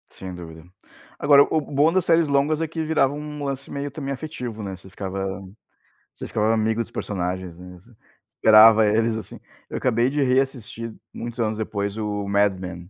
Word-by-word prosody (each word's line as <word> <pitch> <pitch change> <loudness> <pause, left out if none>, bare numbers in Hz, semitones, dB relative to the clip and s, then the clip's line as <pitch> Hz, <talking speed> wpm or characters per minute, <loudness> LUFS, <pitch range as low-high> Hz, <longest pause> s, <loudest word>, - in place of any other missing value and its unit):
Sem 95 -1 -9
dúvida. 80 -2 -10 0.6
Agora 140 -1 +7
o 155 - 0
bom 145 +2 +2
das 185 -2 +1
séries 165 -1 +4
longas 145 +2 +1
é 165 - 0
que 160 +1 -4
viravam 150 -3 +1
um 150 -1 -7
lance 135 -1 -4
meio 140 0 -4
também 140 -1 -4
afetivo, 125 -6 -6
né, 95 -1 -5
você 95 +1 -15
ficava 95 +1 -5 0.9
você - - -7
ficava 110 +1 +1
amigo 110 +1 +1
dos - - -18
personagens, 90 -2 -4
né, 90 0 -11
você 100 +8 -21 0.4
esperava 110 0 +7
eles, 110 +2 +2
assim. 110 - -9 0.3
Eu - - -4
acabei 120 0 +1
de 145 +1 -1
reassistir 125 -4 -1 0.2
muitos 120 0 -7
anos 110 -2 0
depois 100 -2 -3
o 105 -2 -3
Mad 100 -1 +2
Men, 90 -1 -8
115 Hz, 180 wpm, -23 LUFS, 100-140 Hz, 0.9 s, Agora